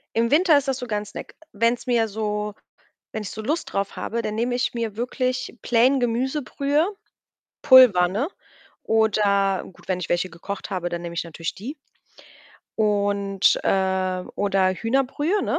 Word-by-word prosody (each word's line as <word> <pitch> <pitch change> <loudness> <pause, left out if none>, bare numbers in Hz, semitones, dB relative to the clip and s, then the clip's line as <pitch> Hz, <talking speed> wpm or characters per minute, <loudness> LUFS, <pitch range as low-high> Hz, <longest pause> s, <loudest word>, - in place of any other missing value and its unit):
Im 230 +1 +2
Winter 315 0 +5
ist 280 0 -4
das 265 - +1
sogar 225 -5 -2
'n 210 - -9
Snack. - - -9 0.2
Wenn's 230 +3 0
mir 235 -3 +2
so 210 0 -3 0.6
wenn 220 - -3
ich 200 - -6
so 220 - -6
Lust 305 +9 -2
drauf 195 0 -2
habe, 235 +1 -3
dann 215 -1 -3
nehme 240 +2 -1
ich 250 +1 0
mir 225 -3 -3
wirklich 255 +1 -2
plain 250 +3 +3
Gemüsebrühe, 275 +5 0 0.8
Pulver, 240 -9 +7
ne? 220 - -1 0.5
Oder 200 -3 +2
gut, - - -20
wenn 180 -1 -1
ich 180 - -5
welche 175 +1 0
gekocht 200 +5 -7
habe, 180 -2 -2
dann 175 0 -4
nehme 170 0 -6
ich 170 - -2
natürlich 165 0 -5
die. 250 +10 -7 1.0
Und, 200 -2 +2
äh 190 -1 +1
oder 195 -2 +2
Hühnerbrühe, 270 - 0
ne? - - 0
220 Hz, 160 wpm, -23 LUFS, 195-250 Hz, 1.0 s, Pulver